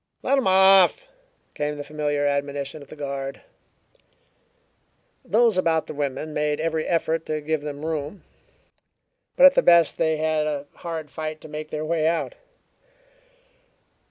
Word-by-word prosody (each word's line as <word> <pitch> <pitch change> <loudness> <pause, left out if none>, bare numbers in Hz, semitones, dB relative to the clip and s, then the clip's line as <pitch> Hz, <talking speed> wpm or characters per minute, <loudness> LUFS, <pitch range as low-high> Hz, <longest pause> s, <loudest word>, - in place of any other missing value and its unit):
"Let 275 - +2
'em 260 - -1
off!" 190 - +5 0.5
came 150 0 -3
the 145 - -5
familiar 145 0 -2
admonition 140 +1 -2
of 140 - -13
the - - -11
guard. 140 -2 -5 1.8
Those 225 -4 +2
about 165 -3 +1
the - - -8
women 145 +1 -4
made 150 0 -1
every 160 0 -1
effort 165 -1 0
to 155 0 -2
give 155 0 -2
them 145 0 -6
room, 155 +3 -4 1.1
but 275 - +7
at 275 - +9
the - - +3
best 170 -2 +4
they 160 -1 +1
had 155 -1 0
a 145 -2 -3
hard 160 -3 -6
fight 155 -1 -5
to - - -11
make 155 0 -7
their 155 0 -4
way 160 -1 0
out. 170 - -1
155 Hz, 150 wpm, -23 LUFS, 145-165 Hz, 1.8 s, at